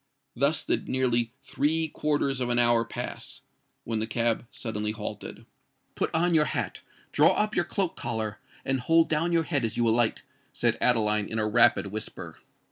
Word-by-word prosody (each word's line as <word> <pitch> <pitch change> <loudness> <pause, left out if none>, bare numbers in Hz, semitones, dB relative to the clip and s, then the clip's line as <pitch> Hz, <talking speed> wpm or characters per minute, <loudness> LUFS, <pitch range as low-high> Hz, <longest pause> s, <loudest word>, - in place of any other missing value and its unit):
Thus 140 +4 +2
did - - -1
nearly 120 -3 +2
three 160 +3 0
quarters 145 -3 -1
of 125 - 0
an 120 - +1
hour 120 -1 +4
pass, 120 +1 -5 0.4
when 115 -1 -2
the 110 - -2
cab 115 +1 0
suddenly 105 -4 -3
halted. 105 -1 -7 0.5
"Put - - -1
on 170 +2 +2
your 155 -2 +4
hat—draw - - 0
up 215 0 0
your 175 - +2
cloak 185 0 -2
collar—and 110 +3 -4
hold 165 +6 +3
down 165 +2 +1
your 165 -1 +3
head 145 -4 -1
as 115 -1 -2
you 120 -1 +2
alight," 115 0 +1 0.3
said - - +1
Adeline 105 -4 +2
in 110 - -4
a 110 - +1
rapid 115 -3 +4
whisper. 110 +1 -7
120 Hz, 165 wpm, -27 LUFS, 110-150 Hz, 0.5 s, hour